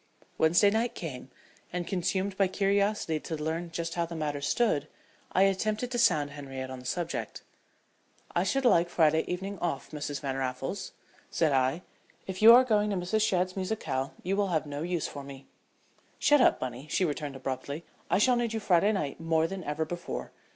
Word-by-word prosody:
Wednesday 175 Hz, +6 st, +5 dB
night 230 Hz, +3 st, 0 dB
came, 135 Hz, -6 st, -6 dB, 0.4 s
and, 180 Hz, 0 st, -3 dB
consumed 190 Hz, +2 st, -1 dB
by 195 Hz, 0 st, +3 dB
curiosity 200 Hz, -3 st, +1 dB
to 160 Hz, -, -5 dB
learn 160 Hz, +3 st, -3 dB
just 165 Hz, +1 st, -3 dB
how 170 Hz, -, 0 dB
the 170 Hz, 0 st, -5 dB
matter 150 Hz, -2 st, -2 dB
stood, 150 Hz, -2 st, +1 dB, 0.4 s
I 190 Hz, -, +4 dB
attempted 215 Hz, +5 st, 0 dB
to 240 Hz, -, -1 dB
sound 150 Hz, -10 st, +3 dB
Henriette 135 Hz, -2 st, -6 dB
on 130 Hz, -, -6 dB
the 125 Hz, -, -9 dB
subject. 170 Hz, -1 st, -3 dB, 0.9 s
"I -, -, +3 dB
should 270 Hz, -1 st, 0 dB
like 175 Hz, -7 st, +4 dB
Friday 160 Hz, -2 st, +3 dB
evening 190 Hz, +2 st, -4 dB
off, 155 Hz, -6 st, -3 dB
Mrs. 145 Hz, -2 st, -4 dB
Van 135 Hz, -2 st, -3 dB
Raffles," 135 Hz, +8 st, -3 dB, 0.4 s
said 160 Hz, -3 st, +1 dB
I. 135 Hz, +5 st, +1 dB, 0.4 s
"If 190 Hz, 0 st, -6 dB
you 225 Hz, +2 st, +10 dB
are 245 Hz, +2 st, +9 dB
going 210 Hz, -4 st, +2 dB
to 200 Hz, -, 0 dB
Mrs. 185 Hz, +4 st, 0 dB
Shadd's 185 Hz, -4 st, +1 dB
musicale 185 Hz, -9 st, -2 dB
you 190 Hz, +2 st, 0 dB
will 200 Hz, 0 st, +1 dB
have 160 Hz, -4 st, 0 dB
no 145 Hz, 0 st, -5 dB
use 175 Hz, -1 st, -1 dB
for 140 Hz, -, -8 dB
me." 135 Hz, -1 st, -10 dB, 0.7 s
"Shut 295 Hz, -2 st, +4 dB
up, -, -, +4 dB
Bunny," 130 Hz, +3 st, -5 dB
she 185 Hz, -, +2 dB
returned, 145 Hz, -3 st, -3 dB
abruptly. 135 Hz, +4 st, -5 dB, 0.2 s
"I -, -, +3 dB
shall 250 Hz, +5 st, +4 dB
need 235 Hz, -2 st, -1 dB
you 225 Hz, -, -1 dB
Friday 200 Hz, 0 st, +3 dB
night 150 Hz, -8 st, -3 dB
more 165 Hz, -1 st, +2 dB
than 185 Hz, +2 st, -5 dB
ever 150 Hz, +1 st, -2 dB
before. 175 Hz, +2 st, -5 dB
170 Hz, 185 wpm, -29 LUFS, 145-200 Hz, 0.9 s, you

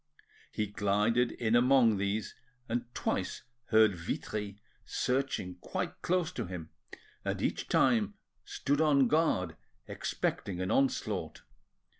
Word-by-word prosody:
He 105 Hz, -, -1 dB
glided 105 Hz, +4 st, +1 dB
in 115 Hz, -1 st, +1 dB
among 120 Hz, -3 st, +5 dB
these, 100 Hz, +2 st, -1 dB, 0.3 s
and 120 Hz, +1 st, -1 dB
twice -, -, -2 dB, 0.2 s
heard 110 Hz, -2 st, +5 dB
Vitry 100 Hz, +4 st, -4 dB, 0.2 s
searching 125 Hz, -9 st, -1 dB
quite -, -, -4 dB
close 180 Hz, -2 st, +1 dB
to -, -, -4 dB
him, 85 Hz, -3 st, -7 dB, 0.5 s
and -, -, -2 dB
each -, -, -1 dB
time 215 Hz, -3 st, +3 dB, 0.3 s
stood 145 Hz, +2 st, -1 dB
on 140 Hz, -4 st, +5 dB
guard 115 Hz, -, +1 dB, 0.3 s
expecting 90 Hz, -3 st, -2 dB
an 95 Hz, 0 st, -1 dB
onslaught. 135 Hz, 0 st, 0 dB
110 Hz, 115 wpm, -31 LUFS, 100-135 Hz, 0.5 s, among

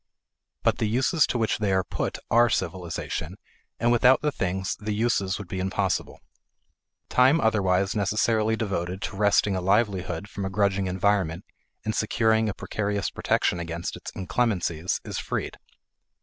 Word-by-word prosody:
But -, -, +2 dB
the 110 Hz, -, +1 dB
uses 130 Hz, +8 st, +2 dB
to -, -, -1 dB
which 110 Hz, -2 st, 0 dB
they 105 Hz, -2 st, 0 dB
are 95 Hz, 0 st, +2 dB
put -, -, -3 dB
are 120 Hz, +1 st, +5 dB
civilization, 85 Hz, -2 st, -3 dB, 0.4 s
and 120 Hz, +1 st, +2 dB
without 125 Hz, +3 st, +5 dB
the 150 Hz, -, +2 dB
things 95 Hz, -5 st, -2 dB
the 105 Hz, 0 st, -3 dB
uses 105 Hz, -4 st, +1 dB
would 100 Hz, -, -8 dB
be 95 Hz, +2 st, -4 dB
impossible. 95 Hz, +1 st, -1 dB, 0.9 s
Time 130 Hz, +6 st, +4 dB
otherwise 100 Hz, -, +2 dB
necessarily 110 Hz, +2 st, +1 dB
devoted 95 Hz, -4 st, -3 dB
to 100 Hz, -, -4 dB
wresting 105 Hz, -1 st, +3 dB
a 95 Hz, -, -1 dB
livelihood 95 Hz, -2 st, 0 dB
from 100 Hz, -, -6 dB
a 95 Hz, -, -2 dB
grudging 100 Hz, -1 st, +1 dB
environment 95 Hz, -2 st, 0 dB, 0.4 s
and 110 Hz, -, 0 dB
securing 110 Hz, 0 st, +2 dB
a 100 Hz, -, -4 dB
precarious 100 Hz, -1 st, -2 dB
protection 90 Hz, -, 0 dB
against 85 Hz, 0 st, -4 dB
its -, -, -8 dB
inclemencies 95 Hz, -4 st, -1 dB
is -, -, -4 dB
freed. -, -, -4 dB
100 Hz, 150 wpm, -26 LUFS, 95-110 Hz, 0.9 s, are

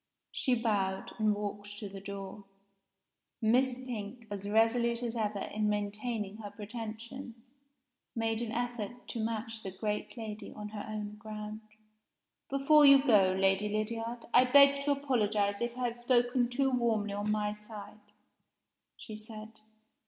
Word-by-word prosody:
She 255 Hz, -, +1 dB
bowed, 200 Hz, -5 st, 0 dB
and 215 Hz, -1 st, +3 dB
walked 205 Hz, 0 st, -5 dB
to 205 Hz, -, -5 dB
the 195 Hz, 0 st, -8 dB
door. 200 Hz, 0 st, -7 dB, 0.9 s
Miss 250 Hz, +3 st, +3 dB
Pink, 235 Hz, -2 st, -6 dB
as 200 Hz, 0 st, -4 dB
resolute 235 Hz, +2 st, +3 dB
as 235 Hz, -1 st, -2 dB
ever 210 Hz, -2 st, -1 dB, 0.2 s
in 210 Hz, 0 st, +1 dB
maintaining 210 Hz, 0 st, -2 dB
her 210 Hz, -2 st, -7 dB
pretensions, 225 Hz, +4 st, -7 dB, 0.8 s
made 225 Hz, 0 st, 0 dB
an 230 Hz, -2 st, -3 dB
effort 240 Hz, -1 st, -4 dB
to 235 Hz, -, -3 dB
match 225 Hz, 0 st, -3 dB
the 195 Hz, -, -5 dB
great 210 Hz, +5 st, -3 dB
lady 220 Hz, -2 st, -6 dB
on 210 Hz, 0 st, -7 dB
her 210 Hz, -1 st, -6 dB
own 210 Hz, -1 st, -5 dB
ground. 215 Hz, 0 st, -7 dB, 0.9 s
"Before 275 Hz, +2 st, +5 dB
you 275 Hz, -1 st, +8 dB
go, 195 Hz, -6 st, +5 dB
Lady 195 Hz, +2 st, +3 dB
Lydiard, 225 Hz, +3 st, -3 dB
I 255 Hz, -, +7 dB
beg 280 Hz, +2 st, +6 dB
to 290 Hz, -, +3 dB
apologize 215 Hz, -8 st, +1 dB
if 240 Hz, +1 st, -2 dB
I 250 Hz, -, -1 dB
have 235 Hz, -, -9 dB
spoken 245 Hz, 0 st, +2 dB
too 270 Hz, +2 st, +1 dB
warmly 225 Hz, -5 st, +1 dB
on 205 Hz, +1 st, -2 dB
my 210 Hz, -1 st, +1 dB
side," 210 Hz, 0 st, -10 dB, 1.0 s
she 215 Hz, -, -8 dB
said. 215 Hz, 0 st, -10 dB
220 Hz, 145 wpm, -32 LUFS, 210-240 Hz, 1.0 s, you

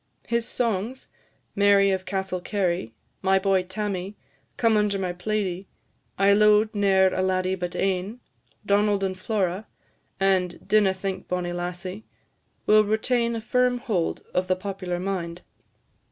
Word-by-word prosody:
His 235 Hz, 0 st, 0 dB
songs, 230 Hz, +2 st, -2 dB, 0.5 s
"Mary 200 Hz, -1 st, +5 dB
of 190 Hz, -1 st, -2 dB
Castlecary," 185 Hz, -, -2 dB, 0.3 s
"My 190 Hz, 0 st, +3 dB
boy, 190 Hz, -1 st, +2 dB
Tammie," 190 Hz, 0 st, -4 dB, 0.4 s
"Come 230 Hz, -2 st, +3 dB
under 210 Hz, -1 st, +2 dB
my 185 Hz, -2 st, -2 dB
plaidie," 190 Hz, 0 st, -2 dB, 0.5 s
"I 195 Hz, +1 st, +5 dB
lo'ed 210 Hz, +1 st, +4 dB
ne'er 190 Hz, -2 st, +3 dB
a 185 Hz, -, 0 dB
laddie 185 Hz, 0 st, +1 dB
but 180 Hz, -2 st, -4 dB
ane," 195 Hz, +4 st, -1 dB, 0.5 s
"Donald 205 Hz, 0 st, +2 dB
and 190 Hz, -1 st, -1 dB
Flora," 190 Hz, 0 st, -2 dB, 0.5 s
and 190 Hz, -2 st, 0 dB
"Dinna 205 Hz, -3 st, +3 dB
think, 190 Hz, 0 st, -4 dB
bonnie 180 Hz, -1 st, -2 dB
lassie," 180 Hz, +3 st, -5 dB, 0.6 s
will 215 Hz, 0 st, +6 dB
retain 235 Hz, +2 st, +1 dB
a 225 Hz, -, -3 dB
firm 250 Hz, +2 st, +2 dB
hold 195 Hz, -8 st, -2 dB
of 180 Hz, 0 st, 0 dB
the 185 Hz, -, +2 dB
popular 185 Hz, -2 st, -4 dB
mind. 180 Hz, -2 st, -4 dB
195 Hz, 135 wpm, -25 LUFS, 185-210 Hz, 0.6 s, will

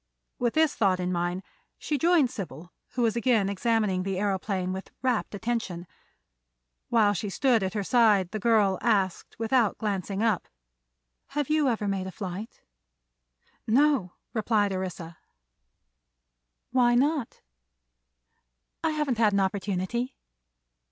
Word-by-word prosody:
With 240 Hz, -1 st, 0 dB
this 315 Hz, -2 st, +3 dB
thought 190 Hz, -4 st, +2 dB
in 180 Hz, 0 st, -1 dB
mind 175 Hz, +1 st, -1 dB, 0.3 s
she 295 Hz, -2 st, -2 dB
joined 325 Hz, -6 st, +4 dB
Sybil, 175 Hz, -, -8 dB, 0.2 s
who 250 Hz, -1 st, 0 dB
was 225 Hz, -1 st, +2 dB
again 235 Hz, -5 st, +2 dB
examining 210 Hz, -2 st, +1 dB
the 190 Hz, +1 st, -2 dB
aëroplane 190 Hz, -1 st, -1 dB
with 190 Hz, +1 st, -6 dB
rapt 245 Hz, -5 st, 0 dB
attention. 210 Hz, -5 st, -3 dB, 1.0 s
While 215 Hz, -3 st, +4 dB
she 205 Hz, +2 st, -3 dB
stood 245 Hz, +2 st, +2 dB
at 190 Hz, +2 st, -2 dB
her 205 Hz, -, 0 dB
side 210 Hz, -5 st, +3 dB
the 215 Hz, -, -3 dB
girl 210 Hz, -3 st, +3 dB
asked, 195 Hz, -6 st, 0 dB
without 230 Hz, -1 st, +2 dB
glancing 200 Hz, -1 st, -2 dB
up: 220 Hz, -5 st, +1 dB, 0.9 s
"Have 295 Hz, 0 st, 0 dB
you 305 Hz, -3 st, +3 dB
ever 215 Hz, -3 st, -1 dB
made 195 Hz, -1 st, -2 dB
a -, -, -6 dB
flight?" 195 Hz, +3 st, -7 dB, 1.0 s
"No," 255 Hz, -6 st, +3 dB, 0.2 s
replied 210 Hz, -3 st, +1 dB
Orissa. 175 Hz, -3 st, -5 dB, 1.5 s
"Why 240 Hz, -1 st, +4 dB
not?" 280 Hz, 0 st, 0 dB, 1.4 s
"I 325 Hz, -, +2 dB
haven't 290 Hz, -6 st, -1 dB
had 215 Hz, -3 st, +4 dB
an 200 Hz, -, +3 dB
opportunity." 195 Hz, +5 st, -1 dB
210 Hz, 130 wpm, -27 LUFS, 190-240 Hz, 1.5 s, joined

